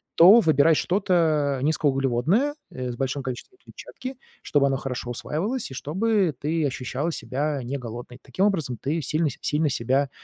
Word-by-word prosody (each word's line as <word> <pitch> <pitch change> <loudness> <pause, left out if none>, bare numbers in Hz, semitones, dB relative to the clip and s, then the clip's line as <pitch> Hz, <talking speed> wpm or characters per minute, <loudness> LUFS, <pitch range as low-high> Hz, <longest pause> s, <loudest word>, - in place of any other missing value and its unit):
то 190 +8 +9
выбирай 160 -4 +4
что-то 160 -7 +1
низкоуглеводное, 145 - +1 0.2
э, 130 -1 -5
с - - -6
большим 135 +2 -2
количеством 130 - -7
клетчатки, 260 +1 -9 0.3
чтобы 145 -1 +2
оно 135 -1 0
хорошо 125 -2 -4
усваивалось 200 - -3
и - - -7
чтобы 190 - 0
ты 155 +1 0
ощущала 135 +4 -2
себя 145 -1 -2
не 130 +4 -3
голодной. 120 0 -8
Таким 190 - 0
образом, 160 - 0
ты 150 +5 -1
сильно 155 +3 0
сь 125 - -9
сильно 150 +1 +1
себя 135 +2 0
145 Hz, 160 wpm, -24 LUFS, 130-170 Hz, 0.3 s, то